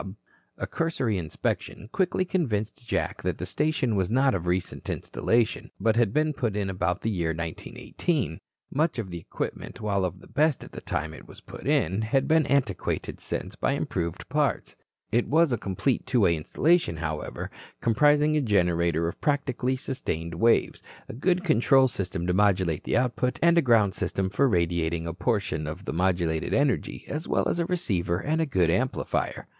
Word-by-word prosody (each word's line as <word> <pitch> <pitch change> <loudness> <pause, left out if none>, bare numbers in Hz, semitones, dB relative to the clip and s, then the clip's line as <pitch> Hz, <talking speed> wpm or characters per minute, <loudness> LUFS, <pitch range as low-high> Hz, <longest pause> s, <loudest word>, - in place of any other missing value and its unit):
A - - -3
cursory 130 - -1
inspection 85 +5 -3
quickly 185 -1 +1
convinced 120 - -2
Jack - - -1
that - - -2
the - - -4
station 150 -6 0
was 95 -2 +1
not 130 +3 +3
of 90 -2 -2
recent 90 0 -2
installation, 115 -1 0
but 110 +2 +2
had 115 -4 +3
been 155 +4 +1
put 120 -8 -2
in 100 -2 -1
about 90 0 -1
the 115 - -1
year 85 -5 -1
1918. 85 - -3 0.3
Much 155 +2 +1
of 105 -6 -4
the 85 - -5
equipment, - - -5
while 100 -3 0
of 90 0 -3
the - - -15
best 150 -1 +1
at - - -12
the - - -8
time 80 +1 -3
it - - -12
was - - -13
put - - -9
in, 95 +7 +2
had 110 +5 +1
been 160 -1 +3
antiquated 125 -8 -1
since - - -4
by - - 0
improved 85 +4 -3
parts. 145 -4 0 0.4
It 120 +2 +2
was 160 -2 +3
a - - +1
complete 100 +8 -1
two 125 -2 +2
way 85 -4 +4
installation, 140 - +1
however, 80 -2 -4 0.3
comprising 150 +6 +3
a 150 - +3
generator 85 - +2
of 85 - -6
practically 130 -3 0
sustained 85 - -4
waves, 115 +8 +2 0.3
a - - -5
good 180 +9 +1
control 135 -4 +4
system 90 -6 -3
to 90 - +1
modulate 95 -5 +2
the - - +1
output, 125 0 0
and 170 0 +6
a 170 - +5
ground 115 -7 +4
system 95 -1 -1
for 135 +6 +3
radiating 85 -3 0
a 85 - -3
portion 90 -5 -1
of 85 +6 -6
the - - -3
modulated 85 -2 0
energy 140 -2 0
as 155 +3 -4
well - - +1
as - - -1
a 170 - 0
receiver 90 - 0
and 155 - 0
a 160 - 0
good 90 -10 +2
amplifier. 130 +9 -1
110 Hz, 180 wpm, -27 LUFS, 90-140 Hz, 0.4 s, and